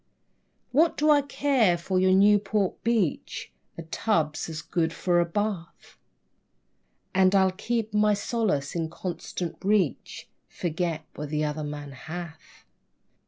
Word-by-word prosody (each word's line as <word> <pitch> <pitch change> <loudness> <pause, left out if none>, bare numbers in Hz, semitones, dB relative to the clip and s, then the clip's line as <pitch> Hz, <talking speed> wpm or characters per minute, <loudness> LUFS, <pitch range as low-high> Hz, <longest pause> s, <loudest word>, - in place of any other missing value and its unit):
What 320 +4 +3
do 305 +1 +4
I 290 -1 +6
care 270 -9 +2
for 185 +2 -1
your 185 0 +4
Newport 200 0 +3
beach? 225 -9 -1 0.3
A 165 - -6
tub's 160 -2 -1
as 155 -1 -6
good 165 0 0
for 175 -1 +1
a 175 - +3
bath. 185 -1 -4 1.1
And 190 +1 +4
I 190 -1 +4
keep 220 +2 -2
my 210 0 +4
solace 200 - -1
in 165 -2 -2
constant 175 0 -5
reach: 195 - 0 0.2
"Forget 165 -2 -3
what 150 0 -6
the 150 0 -1
other 150 +1 -2
man 145 -1 -6
hath." 160 +4 -9
185 Hz, 130 wpm, -26 LUFS, 160-210 Hz, 1.1 s, I